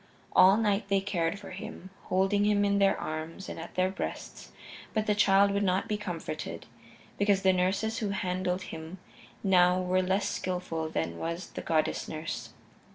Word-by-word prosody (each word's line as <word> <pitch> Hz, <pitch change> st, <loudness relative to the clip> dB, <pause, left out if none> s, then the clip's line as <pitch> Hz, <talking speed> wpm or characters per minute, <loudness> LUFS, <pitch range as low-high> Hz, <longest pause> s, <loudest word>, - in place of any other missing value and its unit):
All 190 Hz, +2 st, +7 dB
night 205 Hz, -2 st, +1 dB
they 200 Hz, 0 st, +3 dB
cared 185 Hz, -3 st, -1 dB
for 200 Hz, -, -10 dB
him, 185 Hz, 0 st, -8 dB
holding 195 Hz, +2 st, +2 dB
him 205 Hz, -1 st, +3 dB
in 200 Hz, 0 st, +2 dB
their 195 Hz, -1 st, +3 dB
arms 160 Hz, +4 st, -5 dB
and -, -, -6 dB
at 165 Hz, -, -9 dB
their 185 Hz, +1 st, +2 dB
breasts, -, -, -6 dB, 0.4 s
but 215 Hz, -1 st, +1 dB
the 210 Hz, -, +2 dB
child 200 Hz, -1 st, +4 dB
would 200 Hz, 0 st, 0 dB
not 190 Hz, -1 st, +1 dB
be 210 Hz, -, 0 dB
comforted, 180 Hz, -5 st, -5 dB, 0.5 s
becauses 200 Hz, -1 st, +3 dB
the 190 Hz, 0 st, +5 dB
nurses 195 Hz, +5 st, 0 dB
who 210 Hz, -, -1 dB
handled 185 Hz, -1 st, -1 dB
him 160 Hz, +2 st, -8 dB, 0.5 s
now 180 Hz, -2 st, +5 dB
were 185 Hz, 0 st, +1 dB
less 190 Hz, +2 st, +1 dB
skillful 180 Hz, -3 st, -3 dB
than 85 Hz, -, -3 dB
was 170 Hz, +2 st, -4 dB
the -, -, -6 dB
goddess 160 Hz, -2 st, 0 dB
nurse. 155 Hz, +1 st, -5 dB
190 Hz, 170 wpm, -29 LUFS, 180-200 Hz, 0.5 s, All